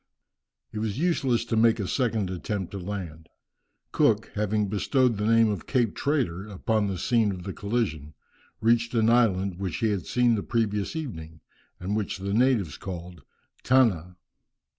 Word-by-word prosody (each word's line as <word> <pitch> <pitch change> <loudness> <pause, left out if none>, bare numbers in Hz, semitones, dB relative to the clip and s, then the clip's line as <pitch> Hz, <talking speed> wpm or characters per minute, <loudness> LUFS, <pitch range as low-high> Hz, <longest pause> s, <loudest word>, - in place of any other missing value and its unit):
It 105 - -5
was 110 -1 -2
useless 135 -8 +1
to 115 - -2
make 115 +1 +4
a 100 - -2
second 110 -7 0
attempt 95 +1 -4
to 100 - -5
land. 90 -5 -6 0.6
Cook - - +2
having 105 0 0
bestowed 120 +4 +1
the 105 +1 -1
name 115 0 +5
of 105 - -4
Cape 120 -6 +1
Traitor 120 - -1
upon 105 +1 -1
the 95 -2 -3
scene 110 +2 +2
of 90 -2 -7
the 95 0 -5
collision, 100 -9 -3 0.5
reached 115 +1 +2
an 115 0 +3
island, 100 -6 +2
which 95 -3 -3
he 110 - +1
had 95 -5 -3
seen 125 -1 +3
the 105 - 0
previous 105 +1 -1
evening, 80 - -6 0.4
and 95 +3 -2
which 105 -3 -2
the 100 +1 -3
natives 115 -8 +2
called 90 -3 -8 0.4
Tanna. 100 -10 +2
105 Hz, 160 wpm, -26 LUFS, 95-115 Hz, 0.6 s, name